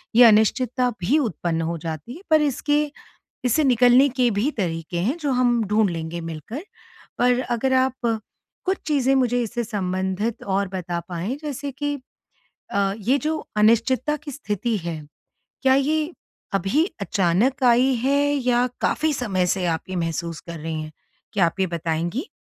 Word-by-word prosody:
ये 245 - +9
अनिश्चितता 240 +3 +3
भी 240 - +2
उत्पन्न 170 - -1
हो 170 - -2
जाती 160 - -6
है 355 - -11
पर 310 -1 +5
इसके 295 +1 +1 0.6
इससे 270 +6 +3
निकलने 250 +1 +5
के 245 -1 +4
भी 210 +8 +1
तरीके 165 -2 -2
हैं 255 - 0
जो 290 -4 -1
हम 245 -2 +2
ढूँढ 210 -1 +3
लेंगे 165 0 -4
मिलकर। 165 - -6 0.5
पर 245 0 +3
अगर 260 +2 0
आप 260 0 +3 0.7
कुछ 380 +1 +1
चीज़ें 270 -3 +2
मुझे 245 -2 +2
इससे 235 +2 -3
संबंधित 190 +1 -2
और 195 0 0
बता 175 -2 -3
पाएँ 180 +9 -3
जैसे 285 -1 -4
कि, 290 +2 -2 0.8
अ, 195 -1 +1
ये 250 +7 +2
जो 310 +2 -1 0.2
अनिश्चितता 235 +7 +3
की 295 0 -9
स्थिति 230 -4 -2
है, 170 -3 -4 0.6
क्या 265 0 +5
ये 305 +4 +1 0.4
अभी 200 +12 +2 0.2
अचानक 200 +8 +1
आई 250 +2 +5
है 280 +2 +3 0.2
या 250 -2 +2
काफ़ी 310 -1 +1
समय 190 -8 0
से 185 +1 0
आप 160 -1 0
ये 185 - -3
महसूस 165 -1 -3
कर 170 -1 -8
रही 160 0 -4
हैं? 155 - -9 0.4
क्या 190 -5 +3
आप 165 - -3
ये 190 - +3
बताएँगी? 170 - -2
230 Hz, 160 wpm, -23 LUFS, 180-265 Hz, 0.8 s, ये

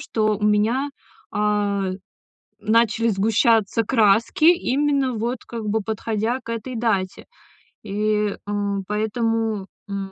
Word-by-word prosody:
что 215 -1 0
у - - -11
меня, 215 +7 +2 0.4
а, 205 -2 0 0.7
начали 230 +1 +2
сгущаться 225 +1 +2
краски, 225 +6 +3
именно, 285 -5 +2
вот, 235 +3 -2
как 230 -2 -6
бы, 220 +2 +1
подходя 220 +3 -2
к 230 - -8
этой 230 +3 -5
дате. 200 -5 -1 0.6
И, 210 0 0
э, - - -3 0.4
поэтому, 220 -1 -1 0.2
м. 195 -1 -5
220 Hz, 115 wpm, -22 LUFS, 210-230 Hz, 0.7 s, краски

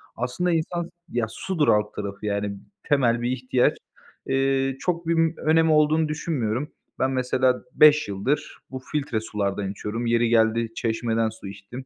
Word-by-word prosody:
Aslında 125 +9 -1
insan 170 +1 -1
s 170 - -10 0.2
ya, 120 -2 0
sudur 160 +5 -1
alt 105 0 +2
tarafı 100 0 -5
yani 100 -1 -2 0.3
temel 120 -6 +2
bir 120 - 0
ihtiyaç. 130 -1 +1 0.5
Eee, 135 0 +1
çok 170 -2 -2
bim 165 -1 +2
önemi 160 0 +3
olduğunu 155 +1 +3
düşünmüyorum. 150 -4 -2 0.3
Ben 130 - +1
mesela 130 0 +1
5 150 -3 +6
yıldır 100 +9 -2
bu 130 - -5
filtre 140 -3 -2
sulardan 100 -2 -2
içiyorum, 105 +4 -4
yeri 115 0 +2
geldi 115 0 +2
çeşmeden 115 0 0
su 110 -2 -10
içtim. 100 +7 -9
125 Hz, 150 wpm, -24 LUFS, 110-150 Hz, 0.5 s, 5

